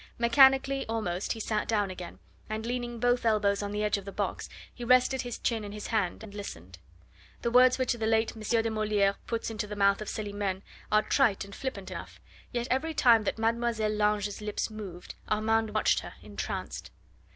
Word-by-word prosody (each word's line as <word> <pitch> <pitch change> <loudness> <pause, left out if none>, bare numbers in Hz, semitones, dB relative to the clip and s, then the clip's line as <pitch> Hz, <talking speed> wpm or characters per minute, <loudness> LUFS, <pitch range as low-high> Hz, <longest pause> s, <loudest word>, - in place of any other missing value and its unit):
Mechanically 270 +3 +5
almost 210 -5 -2
he 225 - -8
sat 215 -1 -1
down 205 -4 +1
again, 180 -1 -8 0.3
and 215 +1 -3
leaning 240 -1 -3
both 245 +1 +2
elbows 210 -3 +2
on 205 0 -3
the 210 0 -1
edge 210 -1 +1
of 195 - -12
the 200 - -6
box, - - -3 0.2
he 245 - -8
rested 255 +2 +4
his 245 -2 -5
chin 225 -3 -1
in 205 0 -7
his 210 0 -7
hand, 215 -2 -1
and 210 -2 -10
listened. 90 - -8 0.6
The 235 - 0
words 255 +1 +6
which 255 -1 +1
the 225 -2 -2
late 225 0 +2
M. 220 - -10 0.2
de 225 - -1
Moliere 210 -2 +2
puts 230 -1 -2
into 215 -1 -3
the 210 - -6
mouth 200 0 +3
of 215 - -4
Celimene 205 -2 -3 0.3
are 215 0 +4
trite 225 -9 +2
and 200 - -12
flippant 205 -8 -5
enough, - - -8 0.3
yet 240 0 -2
every 315 +5 0
time 230 -5 +5
that - - -1
Mlle. 225 -1 0
Lange's 210 -1 0
lips 210 +1 -2
moved 195 -5 -8 0.2
Armand 220 0 +1
watched 215 - +3
her, - - -9
entranced. - - -5
215 Hz, 195 wpm, -29 LUFS, 205-235 Hz, 0.6 s, words